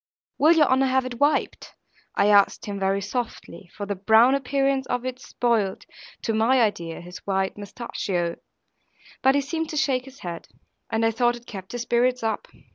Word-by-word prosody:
'Will 315 +3 +6
your 315 -3 +5
honour 265 0 +3
have 260 0 +2
it 240 -2 -6
wiped?' 290 +1 0 0.4
I 200 - +3
asked 200 -1 +4
him 200 -1 -4
very 195 +1 +1
softly, 220 -4 -5
for 205 - -4
the 200 - -2
brown 220 +6 +5
appearance 275 0 0
of 245 0 -2
it 255 0 -4
spoiled 230 -7 -1 0.4
(to 225 - 0
my 230 +4 +3
idea) 175 -8 -1
his 180 +1 -10
white 190 -1 -1
mostacchio; 195 -4 -3 0.8
but 265 +1 +4
he 285 - +3
seemed 320 +3 -3
to 305 - -4
shake 270 -2 +1
his 270 0 -14
head; 170 -2 -6 0.4
and 225 0 +1
I 225 - +3
thought 240 +1 +1
it 240 0 -13
kept 190 -3 -9
his 240 -1 -3
spirits 245 +1 +1
up. 220 -2 -2
235 Hz, 185 wpm, -24 LUFS, 200-265 Hz, 0.8 s, Will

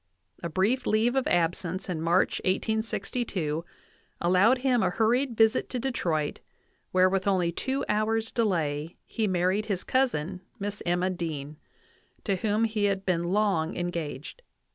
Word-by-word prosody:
A 170 - -3
brief 215 +10 +1
leave 225 +4 +2
of 265 - +1
absence 175 +2 0
in 170 -4 -3
March, 170 +3 +2
1862, 195 -5 -1 0.6
allowed 185 +8 +4
him 250 -2 +2
a 185 - +2
hurried 235 +5 +1
visit 225 +2 +3
to 250 - -3
Detroit, 170 - -1 0.5
where 185 0 +5
with 190 +1 0
only 180 -3 +2
two 265 +10 -2
hours' 220 +1 0
delay 165 -8 -1
he 220 -2 -1
married 185 +3 +1
his 195 -4 -2
cousin, 190 - 0 0.2
Miss 205 +1 -4
Emma 180 +2 +1
Dean, 155 -4 -5 0.7
to 195 -3 0
whom 215 +3 +1
he 215 -2 +1
had 195 -1 0
been 175 -2 +1
long 190 -3 +1
en 175 0 -1
gaged. 155 - -6
190 Hz, 145 wpm, -27 LUFS, 175-220 Hz, 0.7 s, where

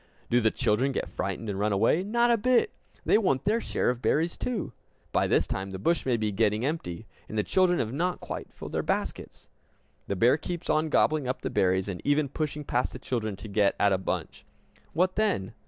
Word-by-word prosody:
Do 120 +1 +4
the 110 - +4
children 125 +6 +1
get - - -3
frightened 115 - -3
and 100 -2 -3
run 105 +1 +1
away? 115 - +3
Not 235 +4 +2
a - - +5
bit! 255 - +3 0.3
They - - +5
want 160 -11 +1
their 220 +3 +2
share - - 0
of 125 - -4
the - - 0
berries, 165 +3 +1
too! 225 - -3 0.4
By - - +2
this - - +3
time 95 0 -4
the 95 - -5
bush 165 - 0
may 125 -2 +2
be 110 -1 -1
getting 105 +3 +1
empty, 115 - -3 0.2
and 110 - -5
the 105 - +2
children 185 - +3
have 115 +1 -2
not 175 +5 -1
quite - - -6
filled - - -9
their - - 0
baskets. - - -3 0.6
The 100 - -1
bear 120 +9 +4
keeps 175 +2 -3
on 155 +1 +1
gobbling 150 -2 +2
up 130 - -3
the - - -2
berries, 95 +1 +2
and 95 -3 -5
even 145 0 +2
pushing 150 +1 -3
past 125 -2 -1
the - - -6
children 115 -5 -3
to 100 - -9
get 100 -1 +2
at 100 -1 +4
a 95 - +1
bunch. 95 - -4 0.5
What 185 +3 +1
then? 190 - 0
130 Hz, 220 wpm, -28 LUFS, 105-170 Hz, 0.6 s, a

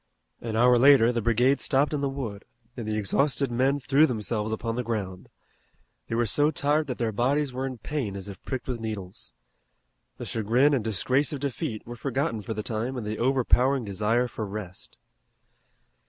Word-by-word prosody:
An 115 -2 -4
hour 120 +1 +5
later 130 -3 +6
the 120 -1 -1
brigade 125 +5 +3
stopped 140 +2 +1
in 145 - -1
the 140 - 0
wood, 115 -7 -5 0.3
and 115 -4 -6
the 110 0 -1
exhausted 135 +6 +1
men 135 +4 +1
threw 145 +3 +4
themselves 110 -2 -2
upon 115 +1 -2
the 125 - -1
ground. 100 -6 -4 0.8
They 115 - -3
were 120 +1 +2
so 145 +8 +3
tired 150 -1 0
that 125 - -4
their 115 -2 -1
bodies 135 +5 0
were 130 +1 -2
in 130 -2 -6
pain 125 -6 -4
as 100 0 -7
if 100 -3 -9
pricked 130 -2 -5
with 125 -2 -3
needles. 105 -5 -6 0.9
The - - -6
chagrin 120 +7 +2
and 130 -6 +1
disgrace 130 +6 +1
of 145 - -4
defeat 120 -5 -4
were 120 - -7
forgotten 135 -1 -2
for 110 +2 -5
the 105 - -3
time 115 +4 -3
in 120 - -4
the 105 +1 -4
overpowering 130 0 +2
desire 110 +5 +1
for 110 - -6
rest. 95 -2 -7
120 Hz, 185 wpm, -26 LUFS, 110-135 Hz, 0.9 s, later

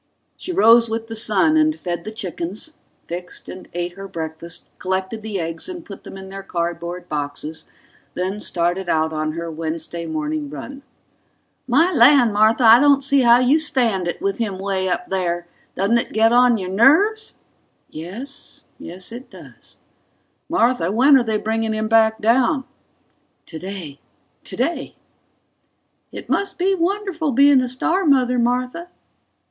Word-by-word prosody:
She 370 - -6
rose 235 - +5
with 225 0 -4
the 225 - -5
sun 240 +9 +3
and 310 0 +3
fed 175 -1 -4
the 215 - -5
chickens, 205 - -5 0.3
fixed 180 +1 -7
and 185 - -10
ate 175 0 -3
her 195 +2 -9
breakfast, 160 -1 -6
collected 190 +3 -3
the 210 -3 -4
eggs 165 - -4
and 350 -2 -8
put 200 - -11
them - - -9
in 190 0 -10
their 195 0 -7
cardboard 170 -1 -4
boxes, 150 +2 -5 0.5
then 190 +3 -3
started 175 +1 -1
out 160 0 +1
on 155 0 -2
her 170 0 -5
Wednesday 165 +1 -5
morning 155 -2 -3
run. 260 - -8 0.9
"My 320 +9 +3
land, 250 -4 +6
Martha, 220 +4 +3
I 230 +1 +8
don't 280 0 +4
see 280 +1 +3
how 240 -1 +6
you 270 +5 +4
stand 235 - 0
it 175 - -3
with 395 -3 -2
him 205 -5 -2
way 190 -1 -2
up 180 0 -2
there! 175 -2 -2 0.3
Doesn't 205 +5 +2
it - - -5
get 225 +1 +3
on 245 -1 +5
your 185 -2 -5
nerves?" 390 - +3 0.6
("Yes... 215 - -8 0.2
Yes, 180 +3 -8
it 245 +3 -10
does.") - - -14 0.7
"Martha, 240 - +1
when 265 +7 +5
are 260 - +4
they 220 -2 -1
bringing 220 +1 -2
him 215 0 -2
back 220 0 +3
down?" 255 +5 +2 0.8
("Today... 170 -4 -8 0.4
Today!") - - -3 1.2
"It - - -9
must 395 -1 -1
be 380 +2 +1
wonderful 365 -4 -1
being 280 +1 +5
a 255 - -1
star 325 +10 0
mother, 255 -5 +3
Martha." 250 +8 -1
220 Hz, 155 wpm, -20 LUFS, 175-265 Hz, 1.2 s, I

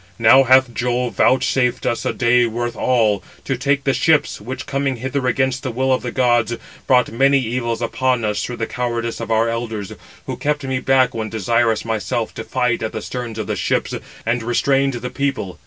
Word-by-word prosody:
Now 115 +4 +7
hath 130 -1 +5
Jove 125 0 -1
vouchsafed 130 -1 +2
us 120 - -1
a - - +1
day 120 0 +3
worth 120 +1 -3
all, 110 -4 +2
506 - - -23
to 135 - +2
take 140 +2 0
the 135 - +1
ships, 155 -6 +2
which, 125 +5 -6
coming 135 -1 -1
hither 130 +2 -2
against 130 0 0
the 130 - -3
will 130 +2 +1
of 130 - 0
the 125 - -4
gods, 120 -2 +2 0.3
brought 125 -2 +3
many 135 +4 +3
evils 120 -2 -2
upon 125 0 0
us 105 -1 -1
through 120 - -5
the 115 - -1
cowardice 120 -1 -3
of - - -5
our 115 +1 +2
elders, 115 -3 -4 0.3
who - - -5
kept 145 0 -1
me 130 -1 -1
back 130 0 +3
when 110 -1 -3
desirous 115 +2 +1
myself 115 +1 -2
to 115 - -6
fight 125 0 0
at 110 - -3
the 110 - -4
sterns 120 -3 -5
of 110 - -3
the 105 +1 -2
ships, - - -1 0.3
and 115 +1 0
restrained 135 +4 +1
the 125 +1 -5
people. 130 -11 -3
120 Hz, 205 wpm, -19 LUFS, 115-130 Hz, 0.3 s, Now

